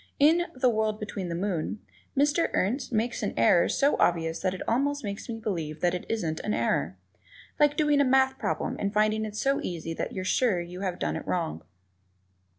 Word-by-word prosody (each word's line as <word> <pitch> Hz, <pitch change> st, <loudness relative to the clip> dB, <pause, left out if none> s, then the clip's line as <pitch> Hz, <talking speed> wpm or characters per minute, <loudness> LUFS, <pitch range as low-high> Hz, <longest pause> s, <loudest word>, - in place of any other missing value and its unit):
In 330 Hz, +5 st, +4 dB
"The 255 Hz, 0 st, +2 dB
World 215 Hz, -2 st, +1 dB
Behind 200 Hz, -4 st, -5 dB
the 170 Hz, -, -2 dB
Moon," 185 Hz, 0 st, -2 dB, 0.4 s
Mr. 290 Hz, +4 st, +3 dB
Ernst 245 Hz, +8 st, 0 dB
makes 235 Hz, +1 st, 0 dB
an 205 Hz, -, -2 dB
error 115 Hz, +9 st, +4 dB
so 280 Hz, +1 st, +2 dB
obvious 165 Hz, -1 st, +1 dB
that 185 Hz, -1 st, -1 dB
it -, -, -7 dB
almost 285 Hz, +4 st, +1 dB
makes 200 Hz, +3 st, -5 dB
me 230 Hz, -, -3 dB
believe 165 Hz, -8 st, -3 dB
that 175 Hz, -1 st, +2 dB
it 180 Hz, -, -4 dB
isn't 165 Hz, -8 st, -1 dB
an 210 Hz, -, -1 dB
error. -, -, 0 dB, 0.6 s
Like 295 Hz, 0 st, +4 dB
doing 295 Hz, -2 st, +3 dB
a -, -, +5 dB
math 265 Hz, 0 st, +3 dB
problem -, -, -2 dB
and 200 Hz, -, -1 dB
finding 215 Hz, +1 st, +2 dB
it 210 Hz, -1 st, -7 dB
so 275 Hz, +5 st, +1 dB
easy 165 Hz, -2 st, -4 dB
that -, -, -4 dB
you're 185 Hz, -1 st, -4 dB
sure 230 Hz, +2 st, +2 dB
that 175 Hz, -, -12 dB
you 180 Hz, +1 st, -7 dB
have 185 Hz, -3 st, -2 dB
it 75 Hz, +1 st, -2 dB
wrong. 80 Hz, +2 st, -2 dB
215 Hz, 200 wpm, -27 LUFS, 180-265 Hz, 0.6 s, a